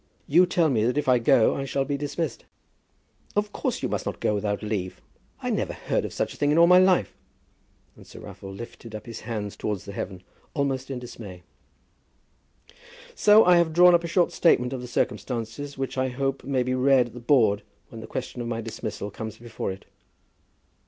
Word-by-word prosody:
You 175 +5 +5
tell 170 -3 +2
me 110 -4 +2
that 125 +4 0
if 150 - 0
I 125 -1 +5
go 115 -1 +4
I 135 - -3
shall 135 0 -1
be 145 +1 -2
dismissed." 145 -1 -4 0.9
"Of 205 0 0
course - - -2
you - - +1
must - - -3
not - - -4
go - - +1
without 105 0 -2
leave. 100 -4 -3 0.4
I - - -1
never - - -1
heard - - -2
of - - -5
such - - -2
a - - -14
thing 145 - +1
in 150 - +3
all 170 - +8
my 180 +1 +7
life." 185 -1 +3 0.8
And - - -16
Sir - - -12
Raffle 95 - -9
lifted 115 +2 -9
up 105 - -8
his 115 -2 -7
hands 105 -3 -5
towards 105 -4 -4
heaven, 95 -2 -6 0.3
almost 135 -2 -1
in 135 - -3
dismay. 105 -7 -9 1.7
"So 215 - +6
I 180 0 +6
have 170 -2 +2
drawn 180 +1 +7
up 170 0 +4
a - - -3
short 175 +1 +2
statement 125 -7 +3
of 130 - -4
the 125 - -7
circumstances, 120 +5 -3
which 135 0 -3
I 130 - +1
hope 135 +1 -2
may 135 -2 0
be 130 +1 -1
read 130 0 +4
at - - -18
the 125 - -8
Board 115 -5 +3 0.3
when - - -9
the - - -9
question 125 - -5
of 120 - -4
my 115 -1 -2
dismissal 110 -2 -5
comes 110 +1 -7
before 115 -4 -5
it." 95 - -10
125 Hz, 205 wpm, -25 LUFS, 110-145 Hz, 1.7 s, all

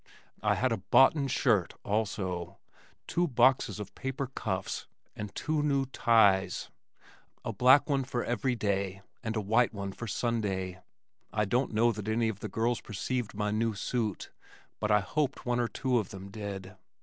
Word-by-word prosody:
I - - +2
had - - +1
a - - +1
"boughten" 140 +1 +5
shirt 110 -8 +2
also, 95 -5 -2 0.5
two 175 +1 +1
boxes 125 - +3
of 105 -2 -7
paper 135 +1 -3
cuffs, 100 -7 -3 0.3
and 105 -1 -5
two 155 -1 0
new 140 -2 +2
ties, 110 -7 +3 0.7
a - - -2
black 130 +3 +6
one 140 -3 +1
for 125 -2 -2
every 120 +2 0
day 100 -3 -1 0.2
and 110 -2 -3
a 110 - 0
white 115 +3 +2
one 100 -1 -4
for 120 +4 -7
Sunday. 95 -5 -1 0.5
I 105 0 +1
don't 125 +7 +1
know 115 +2 +3
that 105 -2 -6
any 110 +1 +1
of 105 -3 -5
the 105 - -5
girls 115 +4 0
perceived 110 +3 -3
my 105 0 -1
new 110 0 0
suit, 110 0 -2 0.5
but 105 - -1
I 105 -1 +5
hoped 140 +5 -2
one 120 0 +1
or 120 - +2
two 125 0 0
of 105 - -4
them 95 0 -9
did. 95 -3 -6
110 Hz, 170 wpm, -30 LUFS, 100-125 Hz, 0.7 s, black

